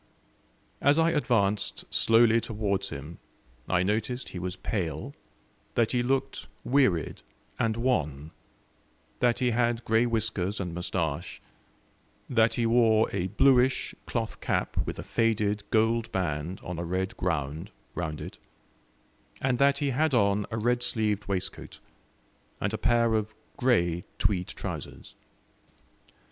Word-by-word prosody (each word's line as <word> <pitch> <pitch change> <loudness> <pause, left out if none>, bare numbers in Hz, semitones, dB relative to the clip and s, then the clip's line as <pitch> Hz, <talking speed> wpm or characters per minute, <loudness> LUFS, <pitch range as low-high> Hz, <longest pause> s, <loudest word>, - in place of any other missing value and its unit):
As 145 +2 +4
I 165 +1 +4
advanced 105 -9 0
slowly 115 0 +5
towards 100 -4 -2
him 75 +3 -8 0.5
I 90 -1 +3
noticed 110 +6 -1
he 90 - -6
was 90 +1 -3
pale, 90 -5 -3 0.6
that 115 -2 +2
he 125 - +2
looked 135 +2 -1 0.2
wearied 125 - +2 0.4
and 115 -1 +1
wan, 80 - -1 0.9
that 120 -1 +3
he 125 -2 +1
had 120 0 0
grey 115 +2 +3
whiskers 110 -4 -1
and 90 -4 -3
moustache, 85 -2 -2 0.9
that 115 -2 +3
he 120 - +1
wore 115 -1 +4
a 95 -2 0
bluish 130 +5 +3
cloth 115 -2 -3
cap - - -1
with - - -4
a - - -5
faded 105 -2 +1
gold 115 +1 +2
band 85 -1 -2
on 90 -2 -5
a - - -2
red 95 +2 -2
ground 80 -4 -2 0.2
round 80 -3 -4
it, - - -8 1.0
and 130 -2 0
that 140 0 +4
he 140 -1 0
had 150 +2 +2
on 100 -2 +2
a 110 - -3
red 120 +2 +1
sleeved 105 -4 -1
waistcoat, 100 0 -4 0.8
and - - -1
a - - 0
pair 115 -1 +3
of 110 0 -1 0.2
grey 85 -9 +2
tweed 95 -2 +1
trousers. - - -7
110 Hz, 130 wpm, -28 LUFS, 90-120 Hz, 1.0 s, slowly